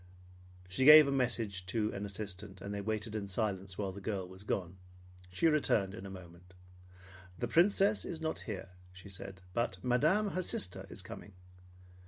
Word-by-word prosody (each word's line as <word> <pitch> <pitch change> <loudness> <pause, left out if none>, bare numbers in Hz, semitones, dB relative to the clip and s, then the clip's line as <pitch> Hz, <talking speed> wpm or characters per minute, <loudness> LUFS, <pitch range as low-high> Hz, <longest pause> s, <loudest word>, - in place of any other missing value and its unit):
She 95 +8 -1
gave 150 +1 +10
a - - 0
message 115 -8 0
to 105 +2 -1
an 100 +1 -4
assistant, 100 -1 -5
and 100 +2 -6
they 100 - -3
waited 110 +1 -3
in 105 -2 -3
silence 95 -2 -2
while 100 -2 -2
the 100 +2 -9
girl 95 -2 -3
was 95 +1 -12
gone. 95 -2 -3 0.5
She 95 - -1
returned 140 -11 +2
in 100 -2 -8
a - - -8
moment. 90 -1 -12 0.8
"The 120 - -2
Princess 195 - +3
is 165 - -5
not 160 0 -3
here," 95 -2 -5 0.2
she 90 +2 -13
said, 95 -1 -9
"but 115 -3 -1
Madame, 155 - +2
her 185 - -1
sister, 90 - 0
is - - -3
coming." 100 - -10
100 Hz, 175 wpm, -33 LUFS, 95-125 Hz, 0.8 s, gave